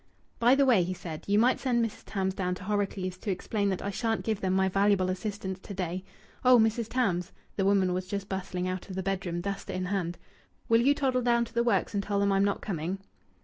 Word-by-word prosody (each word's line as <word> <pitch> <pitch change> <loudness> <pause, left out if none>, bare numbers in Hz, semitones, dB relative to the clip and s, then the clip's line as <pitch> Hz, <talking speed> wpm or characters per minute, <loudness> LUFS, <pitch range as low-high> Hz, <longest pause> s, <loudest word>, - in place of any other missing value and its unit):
"By 240 +3 +6
the 280 0 +4
way," 240 -8 +5
he 180 +1 -2
said, 170 -4 -7
"you 200 +1 +3
might 245 +4 +4
send 240 -3 +2
Mrs. 225 - -7
Tams 190 -2 -1
down 180 -1 -1
to 185 - -10
Horrocleave's 190 -2 -2
to 210 - -5
explain 200 +2 -1
that 190 - -2
I 200 - -2
shan't 225 +1 -1
give 220 -2 -1
them 185 - 0
my 190 0 +3
valuable 195 -1 +2
assistance 190 -1 -4
to 200 +1 -9
day.... 180 0 -3 0.4
Oh! 250 -1 +7
Mrs. 225 0 +2
Tams" 195 -8 0 0.2
the 195 - 0
woman 195 -2 +3
was 185 0 -3
just 200 0 -4
bustling 185 -2 -3
out 185 +1 -4
of 185 - -6
the 190 - -2
bedroom, 185 -3 -2
duster 195 +1 -4
in 185 0 -2
hand 180 -2 -2 0.5
"will 230 0 +5
you 280 +4 +4
toddle 260 -3 +1
down 235 -1 +3
to - - -15
the 235 - +2
works 215 -5 +1
and 200 - +1
tell 200 0 -1
them 200 0 +2
I'm 195 0 +3
not 200 0 0
coming?" 175 0 -3
195 Hz, 235 wpm, -29 LUFS, 185-220 Hz, 0.5 s, Oh